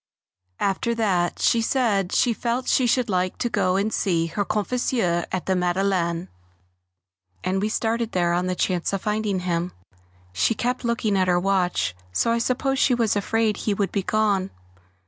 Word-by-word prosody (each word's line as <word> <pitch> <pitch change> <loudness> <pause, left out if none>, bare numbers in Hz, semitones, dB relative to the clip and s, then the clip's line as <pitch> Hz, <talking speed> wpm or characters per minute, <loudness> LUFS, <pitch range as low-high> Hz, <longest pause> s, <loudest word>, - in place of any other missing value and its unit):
After 200 +4 0
that 185 -6 +1
she 230 - +2
said 220 -7 +1
she 240 - +3
felt 240 +2 -2
she 255 - +3
should 250 +1 +2
like 185 -2 -1
to 240 - -1
go 185 -4 +1
and 205 +3 0
see 170 -5 +1
her 185 +5 -2
confesseur 210 -5 0
at 185 - -2
the 190 - +1
Madeleine, 180 -1 0 1.2
and 190 +1 0
we 210 - 0
started 230 +1 -1
there 175 -1 +1
on 180 +1 0
the 185 - -1
chance 180 0 -1
of 195 - -2
finding 210 -3 -1
him. 175 0 -2 0.6
She 220 - +1
kept 245 +3 -2
looking 230 -3 0
at 185 -1 +2
her 175 -1 +3
watch, 180 - 0 0.2
so 230 - +1
I 235 - +1
suppose 260 +3 0
she 255 - +4
was 230 -4 +1
afraid 215 +1 +1
he 210 - -1
would 195 -2 -1
be 200 - 0
gone. 200 -2 +1
200 Hz, 175 wpm, -24 LUFS, 180-230 Hz, 1.2 s, she